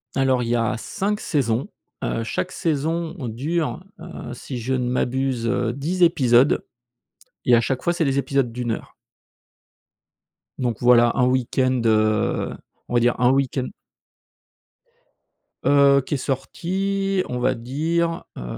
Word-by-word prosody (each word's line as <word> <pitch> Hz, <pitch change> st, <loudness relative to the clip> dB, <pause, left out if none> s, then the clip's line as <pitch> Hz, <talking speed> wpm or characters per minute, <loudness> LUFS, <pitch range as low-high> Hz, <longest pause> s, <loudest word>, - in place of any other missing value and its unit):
Alors, 130 Hz, -2 st, +2 dB
il 115 Hz, -, -3 dB
y 120 Hz, -, +2 dB
a 115 Hz, +1 st, 0 dB
5 205 Hz, -, -2 dB
saisons. 130 Hz, -, -1 dB, 0.3 s
Heu, 115 Hz, -, -1 dB
chaque 90 Hz, -4 st, -3 dB
saison 165 Hz, +2 st, -1 dB
dure, 155 Hz, +9 st, -2 dB, 0.2 s
heu, 170 Hz, -8 st, -8 dB
si 125 Hz, +1 st, -6 dB
je 125 Hz, +3 st, -2 dB
ne 125 Hz, -1 st, -1 dB
m'abuse, 125 Hz, -1 st, -1 dB
heu, 120 Hz, 0 st, 0 dB
10 165 Hz, +8 st, -1 dB
épisodes, 135 Hz, -6 st, +4 dB, 0.8 s
et 120 Hz, -, +5 dB
à 115 Hz, -, +4 dB
chaque 130 Hz, +2 st, -2 dB
fois, 175 Hz, -, +2 dB
c'est 170 Hz, -2 st, 0 dB
des 135 Hz, 0 st, +1 dB
épisodes 135 Hz, -3 st, 0 dB
d'1 120 Hz, 0 st, -3 dB
heure. -, -, -6 dB, 1.7 s
Donc 120 Hz, -4 st, -1 dB
voilà 120 Hz, -1 st, +6 dB
un 125 Hz, -, +3 dB
week-end, 130 Hz, 0 st, +1 dB
heu, 110 Hz, -2 st, +1 dB, 0.3 s
on -, -, -7 dB
va 120 Hz, -, +4 dB
dire 120 Hz, +1 st, +1 dB
un 125 Hz, +1 st, +4 dB
week-end 135 Hz, -1 st, 0 dB, 2.0 s
Heu, 140 Hz, -1 st, +5 dB
qui 145 Hz, -, -1 dB
est -, -, 0 dB
sorti, 190 Hz, +8 st, -1 dB
on 125 Hz, -, -3 dB
va 130 Hz, +1 st, +1 dB
dire, 165 Hz, +8 st, -1 dB
heu, -, -, -6 dB
130 Hz, 145 wpm, -22 LUFS, 120-155 Hz, 2.0 s, voilà